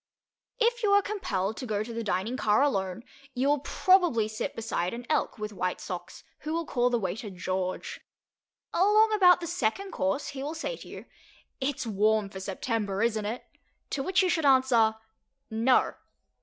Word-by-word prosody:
If 480 +1 +2
you 425 - +2
are 405 - +6
compelled 215 - -2
to 255 - -5
go 210 -1 -1
to 230 +1 -8
the 230 0 -3
dining 205 +4 -1
car 215 0 +3
alone, 195 -6 -1 0.3
you 255 +2 +1
will 290 0 +3
probably 350 - +3
sit 215 0 -4
beside 225 -3 -2
an 240 +1 -8
Elk 305 - 0
with 210 -1 -5
white 185 -1 -2
socks, - - -7 0.2
who 310 - -4
will 335 0 -1
call 245 -3 +1
the 245 - +1
waiter 205 +1 -4
"George." 185 0 -4 0.7
Along 425 +4 +4
about 360 -4 +6
the - - -3
second 345 - -1
course 190 +10 -1
he 270 - -6
will 300 +4 -4
say - - -3
to - - -12
you, - - -9 0.5
"It's 265 -1 -2
warm 215 -1 +1
for 190 - -7
September, 200 +1 -2
isn't 220 -2 0
it?" 235 +4 -5 0.5
to 280 - -1
which 375 +6 +2
you 370 - +2
should 325 -3 +1
answer 260 -5 +4 0.6
"No." 230 +4 +3
235 Hz, 180 wpm, -28 LUFS, 210-315 Hz, 0.7 s, are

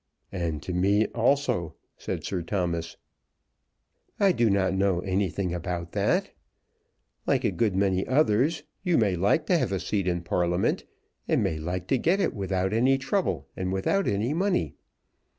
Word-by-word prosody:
"And 85 -5 -3
to 90 - -4
me 100 +4 +3
also," 115 - +1 0.2
said - - -5
Sir 95 -3 -2
Thomas. 85 -2 -2 1.2
"I 200 -2 +5
do 120 -9 +2
not 95 -1 +2
know 95 -2 +1
anything 95 -1 -1
about 85 0 -4
that. - - +1 1.0
Like - - +2
a - - +2
good 110 -5 0
many 95 -1 +1
others, 145 +3 +2 0.2
you 180 -3 +2
may 100 -5 +2
like 100 - +2
to 175 0 +3
have 100 - -1
a 95 - 0
seat 100 -1 -1
in 85 -1 -1
Parliament, 90 +1 0 0.4
and - - +2
may 80 - -1
like 90 +3 -3
to 135 - +2
get 175 +8 +2
it - - +1
without 95 -1 -1
any 130 +4 +3
trouble 135 - -1
and 95 0 -2
without 145 - 0
any 105 +7 0
money. 175 - 0
95 Hz, 160 wpm, -27 LUFS, 90-125 Hz, 1.2 s, I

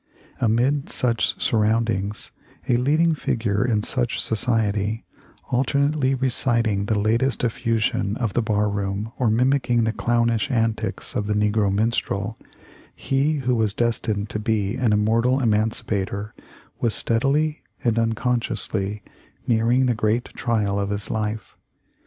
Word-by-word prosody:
Amid 125 +5 +1
such 115 -3 0
surroundings, 110 -2 0 0.4
a 120 - +3
leading 155 +6 +3
figure 110 -8 -1
in 110 -4 +1
such 120 0 0
society, 110 -2 0 0.5
alternately 140 +2 +1
reciting 120 -5 +1
the 110 -2 +1
latest 115 +5 +1
effusion 110 -2 0
of 115 -6 -2
the 120 - +2
bar 105 -2 +1
room 100 +1 -3
or 125 -4 +2
mimicking 125 +1 +2
the 110 - +1
clownish 115 -1 +1
antics 115 -4 -1
of 105 - -2
the 105 - 0
negro 105 -1 +2
minstrel, 105 0 -1 0.6
he 135 +3 0
who 125 - +2
was 110 -3 0
destined 110 -3 -1
to 105 - -3
be 105 -2 0
an 125 -4 +1
im 105 0 +2
mortal 115 +4 +2
emancipator, 105 -3 0 0.5
was 115 -3 +1
steadily 145 +6 +1 0.2
and 115 -3 +2
unconsciously 115 -3 -1 0.4
nearing 120 +3 +2
the 125 - +2
great 110 +2 0
trial 105 -4 0
of 100 0 -1
his 100 0 -3
life. 110 0 -3
115 Hz, 130 wpm, -23 LUFS, 105-125 Hz, 0.6 s, a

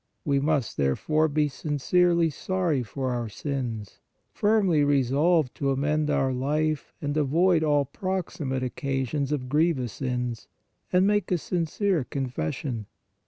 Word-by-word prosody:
We 140 -1 +2
must, 145 -3 0
therefore, 155 - +2
be 150 0 +1
sincerely 165 +4 +1
sorry 175 -4 -1
for 130 +2 -3
our 120 -2 -2
sins, 115 -4 -4 0.3
firmly 200 -8 +3
resolved 145 +2 +2
to 140 - 0
amend 150 +3 +1
our 135 -2 +1
life 150 +4 -1
and 145 0 -1
avoid 160 +4 +3
all 145 -2 +3
proximate 170 -6 -3
occasions 135 +2 -2
of 135 -4 -2
grievous 145 -5 +1
sins, 125 -3 -3 0.4
and 180 +1 +4
make 205 0 +1
a 180 - +3
sincere 175 +1 0
confession. 125 - -3
145 Hz, 125 wpm, -26 LUFS, 130-165 Hz, 0.4 s, and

